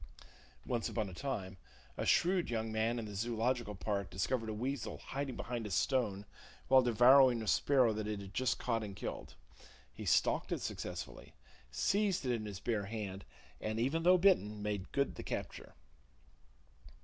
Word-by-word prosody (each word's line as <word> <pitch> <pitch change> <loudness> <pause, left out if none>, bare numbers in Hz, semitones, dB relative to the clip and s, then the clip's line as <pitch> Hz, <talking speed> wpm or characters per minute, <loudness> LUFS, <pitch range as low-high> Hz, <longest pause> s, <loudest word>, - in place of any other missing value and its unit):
(Once 120 -3 -1
upon 110 -3 -2
a - - -9
time, 95 -6 -4 0.4
a - - -3
shrewd 180 0 +3
young 110 -1 -2
man 110 +2 0
in 115 - -3
the 105 - -7
Zoological 115 +1 -1
Park 100 +1 -2
discovered 110 +5 -1
a - - -2
weasel 130 +3 -3
hiding 140 -1 -4
behind 120 -3 -4
a - - -7
stone 105 -1 0 0.4
while 130 0 +7
devouring 125 0 +6
a - - -7
sparrow 125 +3 +3
that 105 0 -3
it 105 -1 -3
had 100 0 -9
just 130 +4 +1
caught 115 -2 -1
and 100 -2 -6
killed. 65 - -6 0.6
He - - -7
stalked - - +2
it - - -1
successfully, - - -6 0.3
seized 190 - +1
it 125 - +1
in 110 -2 -3
his 100 -3 -6
bare 110 -3 -1
hand, 100 -3 -5 0.3
and, 110 +1 -3
even 135 +8 +1
though 180 +2 +6
bitten, 105 - +3
made 105 -2 -3
good 140 0 0
the - - -8
capture.) - - -6
115 Hz, 170 wpm, -34 LUFS, 105-130 Hz, 0.6 s, while